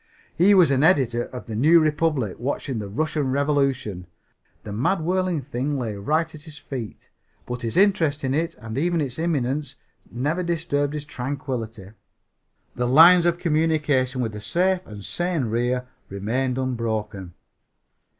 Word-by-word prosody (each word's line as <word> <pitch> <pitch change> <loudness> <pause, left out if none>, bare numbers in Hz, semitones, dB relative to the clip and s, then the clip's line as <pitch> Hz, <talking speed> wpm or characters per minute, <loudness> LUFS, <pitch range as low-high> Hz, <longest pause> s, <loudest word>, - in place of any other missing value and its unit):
He 195 +4 +5
was 180 -6 +5
an 135 -1 +2
editor 130 -8 +3
of 125 - -9
The 110 - -6
New 155 +9 +5
Republic 150 - 0
watching 130 -1 -3
the 100 -2 -6
Russian 150 +4 -1
Revolution. 135 - 0 0.6
The 105 - -7
mad 135 - 0
whirling 180 -1 0
thing 140 +2 -2
lay 115 -5 -3
right 150 +12 0
at 155 - -10
his 155 -1 -11
feet, 125 -8 -8 0.3
but 125 0 -5
his 115 +3 -3
interest 165 -7 +3
in 130 0 0
it 165 +3 -1
and 110 +3 -5
even 170 +2 +1
its 135 -2 -3
imminence 145 -3 -1 0.3
never 145 +9 -1
disturbed 160 -4 -1
his 150 -1 -5
tranquillity. 125 -7 -5 0.8
The 125 0 -1
lines 170 +6 +7
of 170 0 +1
communication 150 -6 +1
with 115 -3 -2
the 105 0 -8
safe 180 - +1
and 105 -2 -9
sane 175 -4 -1
rear 120 +3 -1 0.2
remained 125 +6 -2
unbroken. 110 -7 -3
140 Hz, 150 wpm, -23 LUFS, 120-160 Hz, 0.8 s, lines